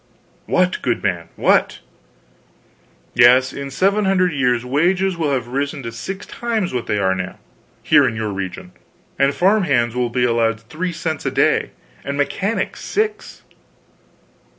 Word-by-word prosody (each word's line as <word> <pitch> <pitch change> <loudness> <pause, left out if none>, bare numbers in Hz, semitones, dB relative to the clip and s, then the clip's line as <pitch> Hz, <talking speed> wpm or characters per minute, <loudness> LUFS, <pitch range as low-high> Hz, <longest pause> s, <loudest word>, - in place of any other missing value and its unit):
"What, 180 0 +1
goodman, 90 -8 -1
what!" - - +2 1.4
"Yes. 125 +2 +5
In 140 0 -6
seven 195 +9 +1
hundred 185 -2 +2
years 125 -3 +1
wages 180 +8 +1
will 160 -3 -1
have 125 -3 -2
risen 140 +2 -3
to 115 - -5
six 190 - -6
times 225 - -2
what 125 -2 -3
they 105 - 0
are 95 -2 +2
now, 95 0 -5 0.5
here 145 -3 +5
in 115 - -2
your 110 -1 -3
region, 95 -2 -6 0.5
and 140 0 +4
farm 195 +6 +2
hands 120 -6 +1
will 125 -1 0
be 125 +1 0
allowed 115 -2 +1
3 155 +11 -4
cents 160 -2 -4
a - - 0
day, - - +2 0.3
and 140 +1 -4
mechanics 195 +9 -2
6." 425 0 -3
140 Hz, 150 wpm, -20 LUFS, 120-180 Hz, 1.4 s, Yes